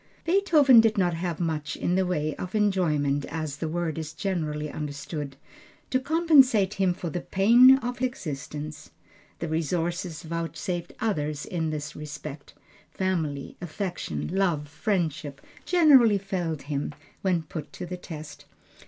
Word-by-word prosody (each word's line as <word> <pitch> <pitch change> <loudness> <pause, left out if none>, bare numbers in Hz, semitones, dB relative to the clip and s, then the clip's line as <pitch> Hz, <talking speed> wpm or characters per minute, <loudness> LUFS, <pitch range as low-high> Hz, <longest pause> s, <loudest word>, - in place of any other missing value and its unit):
Beethoven 320 - +6
did 225 -1 +2
not 180 -3 +2
have 170 -1 -3
much 155 -4 -2
in 175 - -1
the 190 0 +2
way 155 -4 -1
of 185 +3 -5
enjoyment, 155 -9 +1
as 155 -2 -4
the 160 +1 -3
word 165 -1 -2
is 160 0 -6
generally 155 -6 -2
understood, 145 -1 -5 0.6
to 255 - +3
compensate 270 - +4
him 190 -3 +2
for 175 -2 -4
the 175 - -3
pain 240 +9 +6
of 245 -1 -5
existence. 150 - -4 0.5
The 165 - -4
resources 165 +1 -2
vouchsafed 170 +2 -4
others 150 -9 -1
in 165 -3 -2
this 150 -1 -5
respect, 150 -1 -8 0.3
family 160 -7 -2
affection, 175 - -4
love, 175 -7 +1
friendship, 155 -5 -2 0.3
generally 275 - +6
failed 180 -6 -3
him 145 +1 -3 0.3
when 180 -4 +1
put 155 -1 -7
to 180 - -6
the 180 +1 -5
test. 155 -4 -9
170 Hz, 135 wpm, -26 LUFS, 150-195 Hz, 0.6 s, Beethoven